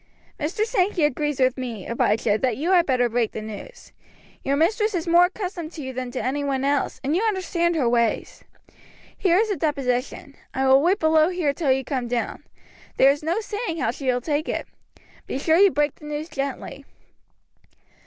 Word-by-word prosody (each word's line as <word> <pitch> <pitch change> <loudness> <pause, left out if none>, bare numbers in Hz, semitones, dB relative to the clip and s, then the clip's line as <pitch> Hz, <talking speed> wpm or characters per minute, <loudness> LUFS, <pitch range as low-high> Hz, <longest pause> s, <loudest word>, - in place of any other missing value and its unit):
"Mr. 375 +9 -1
Sankey 400 -6 +1
agrees 295 0 0
with 255 0 +2
me, 230 -7 -5
Abijah, 225 -2 +1
that 250 -4 0
you 325 +7 -1
had 350 -2 +4
better 250 -2 +2
break 235 -1 -1
the 220 - -5
news. 220 - -10 0.5
Your 275 - +1
mistress 420 +7 +1
is 335 - -2
more 345 +1 +6
accustomed 360 -4 -5
to 305 - -7
you 260 0 -5
than 255 0 -4
to 250 - -4
any 280 +3 -1
one 270 -1 -1
else, 285 -2 0
and 285 +4 0
you 370 - +1
understand 365 -5 0
her 275 -7 +1
ways. 235 -1 0 0.7
Here 360 -2 +2
is 435 +2 +2
the 405 - 0
deposition. 275 -2 -2 0.2
I 265 - -1
shall 265 +1 +5
wait 360 +6 +3
below 315 0 +4
here 350 -6 0
till 285 -3 0
you 265 0 +1
come 255 -3 -2
down. 235 -1 -3 0.5
There 270 - +7
is 290 - -3
no 335 +8 -1
saying 415 -4 -4
how - - 0
she 275 - -7
will 250 -1 +1
take 300 +3 -1
it. - - -2 0.6
Be - - -3
sure 320 +4 +2
you 400 +2 +7
break 295 -4 0
the 300 - -15
news 300 +2 -5
gently." 275 -2 -5
295 Hz, 195 wpm, -23 LUFS, 260-345 Hz, 0.7 s, There